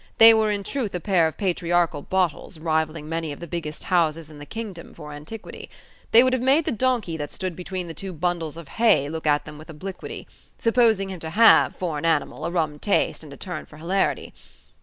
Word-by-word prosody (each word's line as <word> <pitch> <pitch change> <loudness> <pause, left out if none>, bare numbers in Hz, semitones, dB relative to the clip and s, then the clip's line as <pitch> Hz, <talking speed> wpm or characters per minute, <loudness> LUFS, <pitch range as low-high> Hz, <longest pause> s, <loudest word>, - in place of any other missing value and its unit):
They 225 -1 +10
were 220 -1 +2
in 205 -1 -1
truth 225 -3 -3
a - - -1
pair 175 -3 +3
of 160 - -6
patriarchal 175 -4 0
bottles 185 0 -1
rivalling 155 -1 -1
many 165 -1 -3
of 145 - -8
the 170 - -6
biggest 155 -2 -5
houses 165 -3 0
in 150 - -12
the 145 - -10
kingdom 210 -7 -7
for 150 -2 -9
antiquity. 155 +10 -9 0.4
They 230 +2 +7
would 255 0 +2
have 255 - +1
made 275 +5 +3
the 315 - 0
donkey 230 -8 0
that 145 -1 -5
stood 185 -3 -4
between 185 +1 -5
the 165 - -6
two 190 +3 -6
bundles 165 -2 -2
of 170 -3 -9
hay 210 -8 +3
look 160 0 -4
at 145 0 +2
them 150 - -10
with 155 - -13
obliquity: 180 +5 -7 0.3
supposing 225 -4 +3
him 185 - -7
to 160 - -6
have, 220 +7 +6
for 165 -5 -3
an 165 - -4
animal, 160 -1 0
a - - -1
rum 160 -4 -1
taste, 200 -3 0
and 150 - -11
a 140 - -10
turn 180 -5 -6
for 150 - -14
hilarity. 180 +5 -1
170 Hz, 220 wpm, -24 LUFS, 155-200 Hz, 0.4 s, They